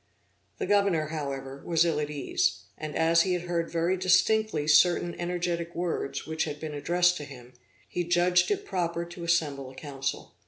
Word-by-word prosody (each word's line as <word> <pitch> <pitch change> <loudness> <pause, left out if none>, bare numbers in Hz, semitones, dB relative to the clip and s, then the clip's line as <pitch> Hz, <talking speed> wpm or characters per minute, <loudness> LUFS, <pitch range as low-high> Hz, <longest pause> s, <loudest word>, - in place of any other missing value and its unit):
The - - -2
governor, 195 -7 +2
however, 140 -3 -5
was 165 -1 +2
ill 160 -3 +1
at 150 -1 -2
ease; 355 - -1
and 155 -1 -6
as 165 +1 +4
he 185 +1 +1
had 175 -1 -2
heard 170 -1 -2
very 170 +2 +1
distinctly 185 -2 +2
certain 170 +3 +4
energetic 175 -1 -2
words 170 -5 -2
which 160 0 -1
had 150 -2 -5
been 155 -1 -5
addressed 175 +5 +2
to 150 - -6
him, 125 -3 -12 0.3
he 175 - -2
judged 175 +1 +3
it 410 0 -1
proper 170 - -2
to 175 0 -9
assemble 150 -6 0
a 130 - -14
council. 135 -2 -5
170 Hz, 180 wpm, -28 LUFS, 150-180 Hz, 0.3 s, as